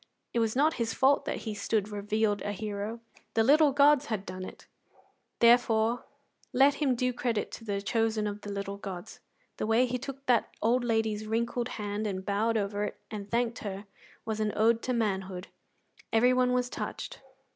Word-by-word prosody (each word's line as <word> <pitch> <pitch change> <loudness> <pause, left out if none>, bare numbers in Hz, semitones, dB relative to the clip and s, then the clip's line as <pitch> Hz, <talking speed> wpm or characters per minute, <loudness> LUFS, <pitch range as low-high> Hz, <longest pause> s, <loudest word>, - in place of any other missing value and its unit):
It 235 - +1
was 225 0 +1
not 300 +4 +4
his 225 -1 -1
fault 275 +2 +3
that - - -3
he 220 - -2
stood 210 0 -1
revealed 210 0 0
a 205 - -2
hero: 210 +2 -4 0.3
the 225 - +4
little 295 +4 +6
gods 285 +1 +5
had 210 -3 -3
done 185 +1 -6
it; - - -10 0.7
therefore 235 -1 +4 0.5
let 275 +3 +5
him 275 -4 +1
do 250 +1 0
credit 235 -3 -1
to - - -8
the 200 -2 -3
chosen 220 0 +1
of 205 0 -4
the 205 - -7
little 200 0 -4
gods. 195 0 -7 0.4
The - - -2
way 225 +3 +4
he 250 0 -2
took 275 +1 -7
that 245 -3 +2
old 240 +3 +2
lady's 220 -2 0
wrinkled 235 +2 -1
hand, 210 0 -2
and 190 -2 -4
bowed 220 +3 +1
over 205 0 -1
it, 210 - -4
and 205 -2 -6
thanked 235 +1 0
her, 200 0 -5 0.4
was 220 -1 -2
an 215 -1 0
ode 225 +1 +3
to 255 - -1
manhood. 190 -5 -2 0.6
Everyone 250 +2 +4
was 250 0 +1
touched. - - -6
225 Hz, 180 wpm, -29 LUFS, 205-245 Hz, 0.7 s, little